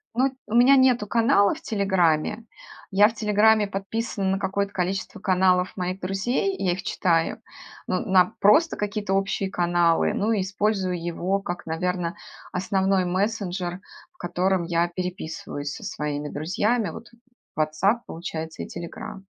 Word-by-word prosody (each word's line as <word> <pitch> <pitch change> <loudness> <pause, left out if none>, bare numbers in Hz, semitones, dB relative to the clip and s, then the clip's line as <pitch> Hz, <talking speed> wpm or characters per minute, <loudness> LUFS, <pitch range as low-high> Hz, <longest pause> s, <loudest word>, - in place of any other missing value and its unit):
Ну, 260 +2 +2 0.2
у 225 - -3
меня 250 +3 +7
нету 255 -5 +4
канала 215 -3 +3
в - - -10
"Телеграме". 190 0 +1 0.5
Я 200 +2 +6
в - - -9
"Телеграме" 215 -1 +3
подписана 195 0 -2
на 195 - 0
какое-то 200 +1 -2
количество 195 +4 -3
каналов 185 0 +2
моих 185 +1 -3
друзей, 240 - -1
и - - -5
я 180 - +3
их 185 - -6
читаю. 165 -2 0 0.5
Но 185 - 0
на 185 +2 +3
просто 305 +12 +5
какие-то 205 -1 -2
общие 195 0 0
каналы, 175 -1 +2
ну, 215 +3 0
и 210 - +1
использую 190 -2 -1
его 175 +3 -1
как, 175 -2 -5
наверно, 175 +2 -2 0.4
основной 190 0 +1
мессенджер, 185 -1 -2 0.3
в 360 - -34
котором 185 0 0
я 170 0 +1
переписываюсь 170 -5 -5
со - - -9
своими 150 0 -3
друзьями. 205 +7 0
Вот 230 - -9 0.5
"Ватсап", 155 +10 +1
получается, 160 -1 -6
и - - -8
"Телеграм". 175 +3 -8
190 Hz, 145 wpm, -24 LUFS, 175-210 Hz, 0.5 s, меня